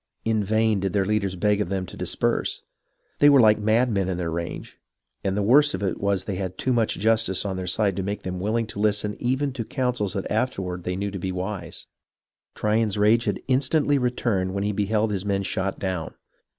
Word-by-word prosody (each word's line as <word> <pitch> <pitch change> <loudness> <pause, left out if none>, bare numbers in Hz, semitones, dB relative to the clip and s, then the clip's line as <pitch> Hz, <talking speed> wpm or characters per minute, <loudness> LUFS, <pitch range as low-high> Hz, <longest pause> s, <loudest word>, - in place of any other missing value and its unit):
In 110 -2 +1
vain 110 0 +2
did 95 -1 -2
their 100 -2 +2
leaders 100 -2 0
beg 105 +2 +1
of 90 - -2
them 95 -1 -2
to - - -11
disperse. - - -1 0.6
They 145 - +7
were 140 -1 +7
hke 110 -1 +5
madmen 110 -3 +2
in 90 - -2
their 85 -2 -2
rage, 85 +1 -5 0.4
and 95 0 -1
the 105 - +1
worst 145 +7 +5
of 95 - -5
it 95 - -2
was 100 -2 +1
that 100 - -4
they 95 - -3
had 95 -1 -4
too 130 - 0
much 115 -2 +1
justice 110 -2 +2
on 95 -2 -2
their 95 -1 -4
side 100 +1 +1
to - - 0
make 100 +2 -4
them 90 -1 -4
willing 110 +4 0
to 105 - -7
listen 105 0 0
even 130 +3 0
to 125 -3 -3
counsels 125 -5 -1
that 100 -2 -4
afterward 95 -6 -2
they 90 - -1
knew 100 +2 -3
to 95 - -5
be 95 +1 -3
wise. 95 +2 -5 0.7
Tryon's 105 -1 +1
rage 110 +3 +4
had - - -1
instantly 145 +2 +2
returned 110 -7 -1
when 100 - -1
he 105 - 0
beheld 105 +2 0
his 95 -2 -2
men 100 -1 0
shot 95 0 -2
down. 90 -4 -3
105 Hz, 215 wpm, -24 LUFS, 95-110 Hz, 0.7 s, They